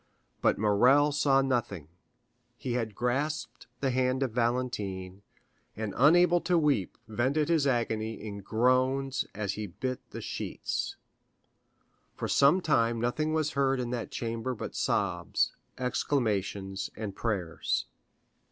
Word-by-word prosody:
But - - +3
Morrel 125 +8 +4
saw 140 -2 +3
nothing; 120 - -1 0.7
he 125 -1 -3
had 115 -4 -2
grasped 125 0 -2
the 135 -2 +1
hand 130 +1 +1
of 130 - -1
Valentine, 110 -6 -2 0.6
and 110 -2 -3
unable 175 +5 +5
to 175 0 +2
weep 145 - +1
vented 130 +8 0
his 160 -4 +3
agony 115 -3 0
in 100 -1 -6
groans 130 +5 +1
as 100 -1 -2
he 105 0 -4
bit 130 +8 -4
the - - -7
sheets. - - -3 1.2
For - - -3
some 145 +7 +5
time 115 -8 +2
nothing 140 +7 0
was 155 -1 +1
heard 135 -2 +1
in 120 -1 -2
that 120 -2 -3
chamber 115 +2 -3
but - - -6
sobs, - - 0 0.2
exclamations, 100 -7 -1
and 105 -3 -5
prayers. 95 -8 -1
125 Hz, 125 wpm, -29 LUFS, 110-135 Hz, 1.2 s, unable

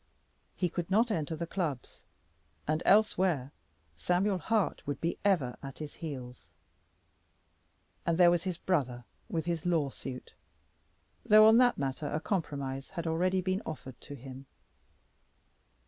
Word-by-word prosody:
He 180 - +1
could 175 0 -4
not 225 +4 +3
enter 160 -4 -1
the 170 +2 -3
clubs, 160 -8 -4 0.7
and 155 +2 +1
elsewhere 185 -9 +3 0.4
Samuel 180 - +1
Hart 215 +3 0
would 145 - -2
be 170 - -2
ever 170 -12 +2
at 135 -1 -8
his 150 -2 -7
heels. 130 -6 -8 1.5
And 165 -1 +1
there 175 -1 +7
was 175 -1 +2
his 185 -2 -3
brother 130 -10 -1 0.3
with 160 -2 -2
his 170 -2 -2
lawsuit, 140 -6 -2 0.9
though 215 0 +8
on 220 +1 +7
that 245 -1 +4
matter 140 +2 -2
a 150 - -1
compromise 140 -7 -3
had 170 -3 -5
already 180 +3 +1
been 185 +2 -1
offered 135 -5 -8
to 145 - -9
him. 135 +1 -10
165 Hz, 135 wpm, -31 LUFS, 140-185 Hz, 1.5 s, though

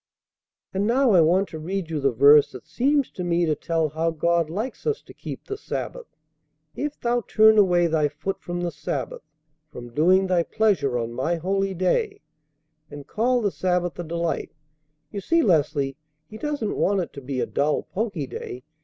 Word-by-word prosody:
"And 195 +2 0
now 255 +1 +3
I 180 -4 +6
want 180 +5 +3
to 160 - -7
read 175 +1 -4
you 155 - -1
the 135 -1 +2
verse 140 +4 +6
that - - -10
seems 280 +2 +1
to 180 - -6
me 175 0 +1
to 155 - +1
tell 160 0 -1
how 160 +3 -1
God 165 0 +1
likes 220 - -5
us 450 0 0
to - - -14
keep - - -8
the 410 - -4
Sabbath. - - -5 0.7
'If 295 0 -4
thou 240 0 0
turn 220 0 +5
away 175 -3 +4
thy 160 -3 +2
foot 150 +7 -5
from 175 0 -4
the 175 -1 -2
sabbath, - - -4 0.5
from 120 -3 -10
doing 185 +7 +4
thy 180 -2 +2
pleasure 170 - +1
on 115 0 -3
my 145 +8 -1
holy 195 +3 -1
day; 410 - 0 0.7
and 145 -1 -9
call 245 - +1
the 205 - +1
sabbath 180 -2 -1
a - - -2
delight' 170 0 -3 0.6
you 200 - -5
see, 330 - +2
Leslie, 145 - +1 0.3
He 215 +7 -11
doesn't 290 -6 -2
want 200 -1 +2
it 175 - -6
to 140 - -8
be 130 0 -4
a - - +1
dull, 145 +2 0
poky 195 -7 -3
day. 125 -1 -7
175 Hz, 190 wpm, -24 LUFS, 155-215 Hz, 0.7 s, I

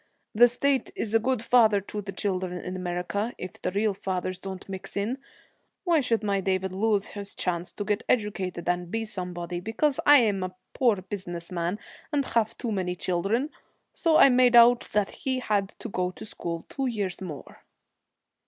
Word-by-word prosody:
The 240 +3 +7
state 265 +3 0
is 220 -1 -2
a 225 - +6
good 250 0 0
father 225 -4 +5
to 205 +1 -6
the 195 -1 -6
children 185 -3 -2
in 180 +1 -5
America, 180 +5 -2
if 185 - -8
the - - 0
real 205 +2 +1
fathers 185 -1 -3
don't 190 -1 -7
mix 190 0 -7
in. 225 +7 -1 0.6
Why 340 -3 +3
should 230 -5 0
my 200 -2 +1
David 190 0 -1
lose 205 0 +1
his 200 -1 -6
chance 175 -1 -2
to 205 - -4
get 210 +1 0
educated 195 -7 -1
and 175 0 0
be 225 +3 -2
somebody, 180 -4 -5
because 225 - 0
I 290 0 +8
am 205 -4 +1
a 185 0 -4 0.2
poor 240 -5 +3
business 180 -3 -6
man, 175 +2 -1 0.3
and 285 -2 +1
have 230 -1 0
too 235 - -3
many 185 -3 -1
children? 195 - 0 0.4
So 325 -2 +3
I - - +8
made 250 -1 +5
out 240 +1 +7
that 210 -1 +1
he 260 -1 -2
had 205 -6 -1
to - - -7
go 180 -4 -1
to 185 - -10
school 170 -5 -5
two 270 -1 -2
years 205 -7 -3
more.' 160 -7 -8
200 Hz, 185 wpm, -27 LUFS, 185-230 Hz, 0.6 s, I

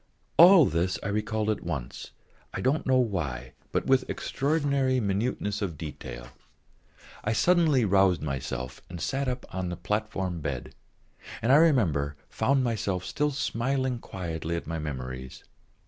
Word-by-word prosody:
All 175 -2 +9
this 85 +1 0
I - - -2
recalled 105 +1 -1
all 110 - +2
at - - -13
once, 75 -8 -5 0.5
I - - -2
don't 135 +4 0
know 130 0 +4
why, 75 - -1 0.2
but - - 0
with 130 -1 +2
extraordinary 140 -2 0
minuteness 105 0 -1
of 90 -7 -3
detail. - - -7 0.9
I 105 - 0
suddenly 155 -3 +3
roused 95 -4 +3
myself 65 -3 -4
and 85 -1 -7
sat 135 - -1
up 125 0 -3
on 95 -1 -2
the 90 - -5
platform 100 -5 -2
bed, 70 -4 -4 0.7
and, 115 - +1
I 140 - +8
remember, 90 - +3 0.2
found 135 -1 +2
myself 100 -6 -1
still 150 +9 0
smiling 130 -1 -1
quietly 85 -5 -4
at 85 - -4
my 80 +1 -3
memories. 65 -3 -6
100 Hz, 145 wpm, -27 LUFS, 80-130 Hz, 0.9 s, All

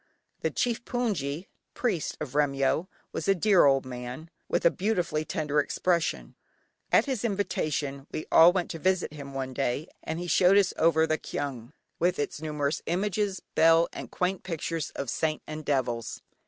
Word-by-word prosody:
The - - 0
chief 235 -1 -1
hpoongyi 185 - -2 0.3
(priest) 205 -11 -1
of 150 -4 -5
Remyo 145 +3 +1 0.2
was - - -4
a 195 - +5
dear 195 -1 +5
old 135 -1 +4
man, 125 +5 -7 0.2
with - - 0
a 170 - +7
beautifully 180 -6 0
tender 150 -2 -1
expression. 170 +3 0 0.6
At - - +5
his 260 -6 -2
invitation 155 - -2
we 155 - -4
all 165 +2 +8
went 180 -1 -1
to 165 - -6
visit 185 -2 +1
him 140 -2 -9
one 130 -1 -3
day, 135 +4 -1
and 160 - -4
he 175 - -4
showed 180 +2 +5
us 195 -3 +3
over 160 -1 +4
the 155 0 0
kyaung, 130 -4 -5 0.3
with 175 +2 +2
its 145 0 -3
numerous 150 -1 -1
images, 195 +2 -1
bell, 165 +1 +5
and - - -7
quaint 180 0 -1
pictures 165 -2 -3
of 140 - -3
saints 155 -1 -1
and 155 0 -6
devils. 125 -5 -1
160 Hz, 170 wpm, -28 LUFS, 140-185 Hz, 0.6 s, all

